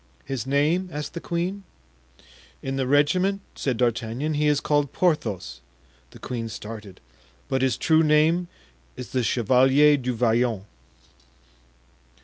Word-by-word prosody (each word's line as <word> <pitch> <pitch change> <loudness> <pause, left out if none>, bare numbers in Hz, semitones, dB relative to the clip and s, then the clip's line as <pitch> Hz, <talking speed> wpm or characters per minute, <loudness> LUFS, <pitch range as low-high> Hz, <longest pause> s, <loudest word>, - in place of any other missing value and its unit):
"His 130 -3 -4
name?" 155 +7 +1
asked 150 -1 -5
the 170 - -5
queen. 180 +4 -3 1.0
"In 135 0 -3
the 135 -1 -1
regiment," 180 +8 +2
said 130 -4 -2
D'Artagnan, 120 +5 -1
"he 150 0 +1
is 145 -1 +3
called 145 -2 0
Porthos" 115 - -1 0.5
(the - - -14
queen 115 -3 -5
started), 105 -3 -9 0.5
"but 130 -1 -1
his 130 -2 +1
true 160 -1 +3
name 160 +3 +3 0.5
is 125 - -7
the 130 - 0
Chevalier 130 +6 +4
du 125 -2 -3
Vallon." 115 -3 +1
135 Hz, 130 wpm, -24 LUFS, 120-155 Hz, 1.0 s, Chevalier